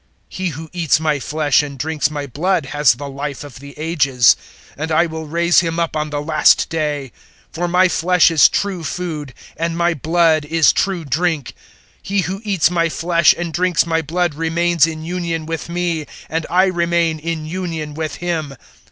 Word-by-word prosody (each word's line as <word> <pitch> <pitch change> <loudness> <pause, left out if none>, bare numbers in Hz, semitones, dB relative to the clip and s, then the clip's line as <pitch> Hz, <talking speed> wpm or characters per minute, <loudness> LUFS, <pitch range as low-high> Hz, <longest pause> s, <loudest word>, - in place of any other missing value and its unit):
006:054 - - -12
He 185 0 -1
who 160 0 -6
eats 165 -4 +2
my 155 -2 0
flesh 150 +1 +1
and 140 -2 -7
drinks 150 +2 -1
my 145 -2 -4
blood 160 +5 -1
has 145 -2 +3
the 140 +3 -7
Life 140 0 -5
of 145 -3 -11
the 140 +1 -12
Ages, 140 -6 +3 0.4
and 160 +3 -4
I 165 +2 +4
will 160 -1 -6
raise 170 +2 +3
him 165 -1 -1
up 170 -2 -1
on 155 0 -2
the 145 0 -3
last 155 -1 +3
day. 150 -5 -2 0.4
006:055 - - -38
For 175 +2 -2
my 180 +2 +4
flesh 180 0 +3
is 160 -3 +6
true 195 -4 -2
food, 155 -7 -5 0.2
and 165 0 -2
my 170 0 +2
blood 160 +1 +2
is 160 +1 +3
true 185 -4 -1
drink. 155 0 -1
006:056 - - -11 0.5
He 200 +1 -1
who 190 +3 -4
eats 190 -6 +1
my 170 -1 +1
flesh 170 +1 +3
and 170 -2 -4
drinks 175 0 +2
my 165 -1 0
blood 170 +1 -1
remains 165 +1 +2
in 160 -1 -6
union 170 -2 -3
with 165 +1 -5
me, 170 -3 -2 0.2
and 165 0 -2
I 185 +2 +4
remain 170 -3 0
in 160 0 -4
union 165 -3 -4
with 155 -1 -4
him. 160 -5 -3
160 Hz, 195 wpm, -18 LUFS, 150-175 Hz, 0.5 s, is